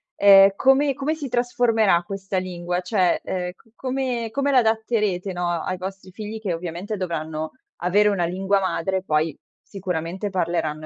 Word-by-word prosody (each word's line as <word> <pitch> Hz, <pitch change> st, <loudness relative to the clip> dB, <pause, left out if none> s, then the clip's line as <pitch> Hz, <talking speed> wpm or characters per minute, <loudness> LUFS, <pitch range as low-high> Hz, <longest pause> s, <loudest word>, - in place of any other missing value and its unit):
ehm, 195 Hz, -1 st, +8 dB
come 270 Hz, +3 st, +4 dB
come 280 Hz, +4 st, -2 dB
si 290 Hz, -4 st, -6 dB
trasformerà 230 Hz, -6 st, +2 dB
questa 195 Hz, +1 st, -4 dB
lingua? 180 Hz, -1 st, -2 dB
Cioè, 180 Hz, -1 st, +1 dB
ehm, 180 Hz, -1 st, -3 dB, 0.2 s
come 255 Hz, -3 st, -2 dB
come 280 Hz, +4 st, 0 dB
l'adatterete 220 Hz, -6 st, +1 dB
no, 175 Hz, -1 st, -2 dB, 0.2 s
ai 185 Hz, -, -2 dB
vostri 190 Hz, 0 st, -7 dB
figli 215 Hz, +2 st, -7 dB
che 200 Hz, -4 st, -2 dB
ovviamente 175 Hz, +5 st, -5 dB
dovranno 160 Hz, -3 st, -3 dB, 0.3 s
avere 205 Hz, +4 st, +3 dB
una 190 Hz, -4 st, +1 dB
lingua 190 Hz, +3 st, +1 dB
madre, 190 Hz, 0 st, -1 dB
poi, 155 Hz, -3 st, 0 dB, 0.3 s
sicuramente 185 Hz, 0 st, -4 dB
parleranno, 165 Hz, -4 st, -1 dB
190 Hz, 145 wpm, -23 LUFS, 175-220 Hz, 0.3 s, ehm